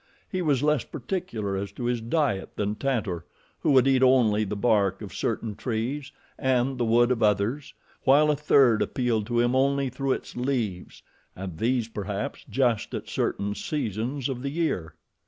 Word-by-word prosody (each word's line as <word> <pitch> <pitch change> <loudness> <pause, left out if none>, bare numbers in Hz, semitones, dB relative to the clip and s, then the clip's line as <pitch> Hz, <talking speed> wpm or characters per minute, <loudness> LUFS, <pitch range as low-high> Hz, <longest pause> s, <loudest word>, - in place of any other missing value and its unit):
He 185 - -3
was 145 -5 +1
less 150 -3 +2
particular 115 - -4
as 100 0 -3
to 120 - -7
his 120 -1 0
diet 115 -5 -1
than 105 0 -1
Tantor, 105 - -2 0.4
who - - 0
would 130 0 +5
eat 135 -1 +4
only 120 -5 +4
the 105 0 -3
bark 100 -3 +2
of 100 - -8
certain 110 -1 -2
trees, 130 +6 -3 0.3
and 130 0 +1
the 120 - +2
wood 120 +2 +4
of 125 - 0
others, 105 +7 +1 0.3
while 150 +3 +5
a - - +1
third 135 -6 +4
appealed 115 -5 0
to 120 -1 0
him 120 +1 +2
only 140 0 +2
through 135 +1 -1
its - - -7
leaves, 120 -8 -3 0.3
and 90 -3 -7
these, 120 0 +1
perhaps, 105 +3 -4
just 120 -5 +1
at - - -5
certain 100 +1 -1
seasons 120 +1 -3
of 130 -3 -4
the 140 - -2
year. 140 - -2
120 Hz, 175 wpm, -26 LUFS, 105-135 Hz, 0.4 s, would